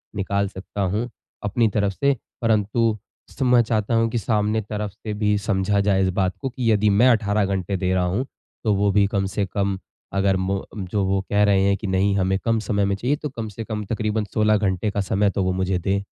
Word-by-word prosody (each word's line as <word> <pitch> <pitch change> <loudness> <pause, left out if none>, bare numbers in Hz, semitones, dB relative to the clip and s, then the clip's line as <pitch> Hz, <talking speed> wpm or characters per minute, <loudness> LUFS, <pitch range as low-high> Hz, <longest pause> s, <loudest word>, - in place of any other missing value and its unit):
निकाल 100 0 0
सकता 95 +1 -7
हूँ, 105 +6 -1 0.3
अपनी 110 +3 +2
तरफ 100 -1 0
से। 140 +6 +2 0.3
परंतु 110 0 +1 0.3
सर, - - -4
मैं 125 -1 +5
चाहता 110 -1 -1
हूँ 115 0 +2
कि 120 - -2
सामने 110 0 0
तरफ 105 0 -4
से 105 +1 -7
भी 105 0 +1
समझा 100 0 0
जाए 100 -1 +2
इस 95 - +2
बात 95 0 -1
को 135 - -2
कि 120 -3 0
यदि 105 0 +3
मैं 130 - +7
18 105 -3 +2
घंटे 95 0 -2
दे 95 0 0
रहा 90 -1 +2
हूँ, 100 +9 -1 0.4
तो 110 -3 +2
वो 100 +1 +2
भी 100 +1 +4
कम 100 -1 -1
से 100 - +1
कम, 100 0 -1 0.4
अगर 95 -1 +2
मो 95 +1 -2
जो 100 +1 -2
वो 95 0 +1
कह 105 0 +3
रहे 100 -2 +4
हैं 100 0 +3
कि, 105 - -5
"नहीं, 95 +1 +2
हमें 95 0 +1
कम 115 -1 +2
समय 100 -2 0
में 100 - 0
चाहिए।" 125 +8 0
तो 150 0 -5
कम 115 -4 -5
से 110 +3 -7
कम 105 -1 -4
तकरीबन 110 0 -1
16 110 0 +3
घंटे 100 0 0
का 100 - -1
समय 100 +1 +1
तो 100 0 -1
वो 95 - +1
मुझे 95 0 0
दें। 100 +3 -1
100 Hz, 230 wpm, -23 LUFS, 95-110 Hz, 0.4 s, मैं